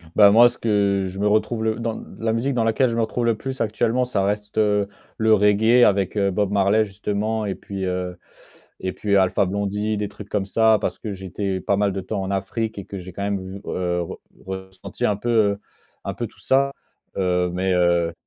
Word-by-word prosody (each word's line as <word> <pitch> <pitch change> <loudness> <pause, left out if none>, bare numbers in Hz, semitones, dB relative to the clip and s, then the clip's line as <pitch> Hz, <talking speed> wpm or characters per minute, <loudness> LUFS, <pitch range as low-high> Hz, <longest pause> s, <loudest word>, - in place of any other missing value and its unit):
Bah, 100 -1 +8
moi, 120 +3 +8
ce 120 - -4
que 100 -3 +1
je 95 - -8
me 105 - +2
retrouve 110 +2 +1
le 110 0 +1
dans 115 -1 -4 0.2
la 110 0 0
musique 120 +5 0
dans 120 -2 +1
laquelle 115 +3 +2
je 115 - -2
me 115 - +1
retrouve 120 +1 -1
le 115 -1 +2
plus 130 +4 -6
actuellement, 115 +3 +1
ça 105 -6 -1
reste 105 +1 -2
heu, 105 -2 +2 0.3
le 110 0 +4
reggae 110 +4 +5
avec 100 -1 +1
heu, 100 -2 +2
Bob 100 +1 0
Marley, 100 +2 +3
justement. 105 +2 -2
Et 100 - -1
puis 95 0 -6
heu, 90 -1 -3 0.6
et 95 -1 -3
puis 100 -1 +1
Alpha 95 +2 +3
Blondy, 100 +2 -1
des 105 - -2
trucs 105 -1 -11
comme 95 - -1
ça. 110 +2 +4
Parce - - -3
que 105 - -5
j'étais 95 0 -3
pas 100 - +1
mal 100 0 +2
de 95 - -3
temps 100 +1 -3
en 95 - -3
Afrique 105 +3 -2
et 100 - -6
que 100 - -7
j'ai 90 0 -8
quand 100 - -5
même 100 -1 -1
v 95 +1 -7
heu, 90 -1 -1
re 85 - -8 0.3
ressenti 95 0 -5
un 105 - +1
peu 120 +4 -4
heu, 105 -3 +3 0.5
un - - -2
peu - - -4
tout - - -22
ça, 135 +1 +2 0.5
heu. 90 -2 +1
Mais, 95 +1 0
heu, 85 -1 +2
100 Hz, 225 wpm, -22 LUFS, 95-110 Hz, 0.6 s, Bah